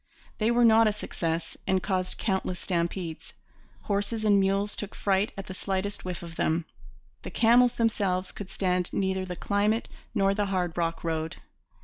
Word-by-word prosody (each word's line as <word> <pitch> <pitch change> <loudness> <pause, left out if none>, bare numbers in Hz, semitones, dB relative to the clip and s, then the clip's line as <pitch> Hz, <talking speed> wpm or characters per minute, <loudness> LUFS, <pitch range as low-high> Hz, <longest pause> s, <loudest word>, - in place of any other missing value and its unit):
They 215 +1 +2
were 240 0 +4
not 225 0 +6
a - - +4
success 165 -5 -3
and 190 -1 +2
caused 185 -2 -1
countless 190 -3 -1
stampedes. 170 -2 -3 0.5
Horses 205 +2 -1
and 205 -1 +5
mules 195 +1 +1
took 210 - -5
fright 195 +1 +1
at 195 - -5
the 190 - -7
slightest 195 +2 -2
whiff 180 -1 -5
of 170 -1 -9
them. 160 +1 +1 0.6
The - - -6
camels 240 +1 +5
themselves 200 -5 +1
could 200 -2 -8
stand 180 -2 0
neither 190 -1 0
the 180 -1 -5
climate 210 +5 +1 0.3
nor 195 0 +3
the 205 0 0
hard 180 -3 -1
rock 165 -1 -1
road. 160 -1 -2
195 Hz, 165 wpm, -28 LUFS, 180-210 Hz, 0.6 s, not